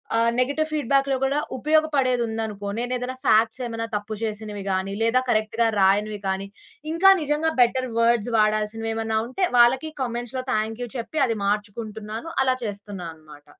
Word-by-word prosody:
ఆహ్, 230 +1 +3
నెగెటివ్ 285 +5 +1
ఫీడ్‌బ్యాక్‌‌లో 275 -2 +1
కూడా 275 +2 +1 0.2
ఉపయోగపడేది 285 -5 +2
ఉందనుకో, 220 -2 -4
నేనేదైనా 250 +1 -3
ఫాక్ట్స్ 225 +3 +3
ఏమైనా 230 0 -4
తప్పు 210 +1 -4
చేసినవి 210 -2 -4
గాని, 190 +1 -1
లేదా 230 +3 +3
కరెక్ట్‌గా 225 +1 +1
రాయనివి 205 +2 +2
కానీ, 190 +1 -2 0.5
ఇంకా 385 +3 +7
నిజంగా 300 +2 0
బెటర్ 255 +1 +2
వర్డ్స్ 235 0 +2
వాడాల్సినవేమైనా 220 +1 0
ఉంటే 370 +9 0
వాళ్ళకి 260 +6 +4
కామెంట్స్‌లో 240 +1 -4
థాంక్ 220 +2 -1
యూ 240 - -6
చెప్పి 290 +6 -3
అది 225 -1 -1
మార్చుకుంటున్నాను, 215 +4 -3
అలా 260 -1 +2
చేస్తున్నా 200 -3 -6
అన్నమాట. 150 -2 -16
230 Hz, 140 wpm, -24 LUFS, 210-255 Hz, 0.5 s, ఇంకా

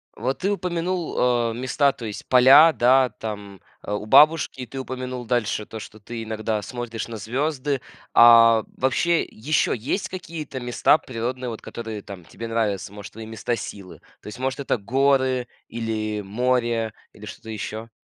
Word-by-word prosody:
Вот 130 +5 -2
ты 195 +2 0
упомянул, 180 -2 -2
э, 120 -2 +2
места, 130 +3 +1
то 120 -4 -9
есть 105 - -7
поля, 135 +6 +8
да, 130 -1 +4
там, 100 -3 -7 0.3
у 105 +1 -3
бабушки, 150 0 +4
ты 135 +3 -7
упомянул 130 -1 -5
дальше, 110 -3 -1
то, 110 - -8
что 110 +1 -11
ты 115 +2 -7
иногда 110 -1 -2
смотришь 120 0 -5
на 115 -1 -7
звёзды, 135 +4 -2 0.3
а 115 -1 +7
вообще 165 +6 +2
ещё 150 +8 0
есть 180 - -2
какие-то 160 -7 -6
места 120 +4 +3
природные, 125 0 -4
вот 110 - -7
которые 110 -3 -7
там 95 -3 -10
тебе 115 +7 -8
нравятся? 105 -3 -2
Может 105 -1 -10
твои 110 +1 -8
места 110 +2 -3
силы? 100 -3 -9 0.2
То - - -13
есть 105 - -8
может 130 +1 -2
это 130 - 0
горы, 130 +2 +1 0.2
или 110 -2 -3
море, 115 +1 0 0.2
или 105 - -12
что-то 110 +1 -10
ещё? 110 +1 -6
120 Hz, 160 wpm, -23 LUFS, 110-130 Hz, 0.3 s, поля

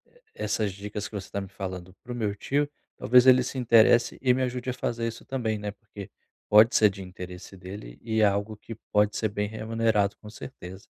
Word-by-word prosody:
e - - -22 0.2
essas 105 - -1
dicas 105 +1 -6
que - - -20
você 100 -2 -5
está 100 - -4
me 95 - -7
falando 95 -2 -7
para 125 - -9
o - - -4
meu 105 -4 -2
tio, 145 +6 -1 0.3
talvez 125 +1 +5
ele 130 0 +7
se 130 - -5
interesse 115 -1 +4
e 125 -2 +4
me 130 - -1
ajude 125 0 -2
a - - -1
fazer 115 -2 -2
isso 115 - -7
também, 115 -5 -2
né, 105 0 -4
porque 100 -1 -11 0.4
pode 110 +3 +6
ser 105 - +6
de 100 0 -9
interesse 90 0 -9
dele 90 -10 -9
e 110 -1 -1
é - - +6
algo 100 +1 0
que 115 - -9 0.2
pode 105 0 +3
ser 110 - 0
bem 105 0 -2
remunerado 110 -2 0
com 105 - -12
certeza. 100 -4 -10
105 Hz, 220 wpm, -27 LUFS, 100-115 Hz, 0.4 s, ele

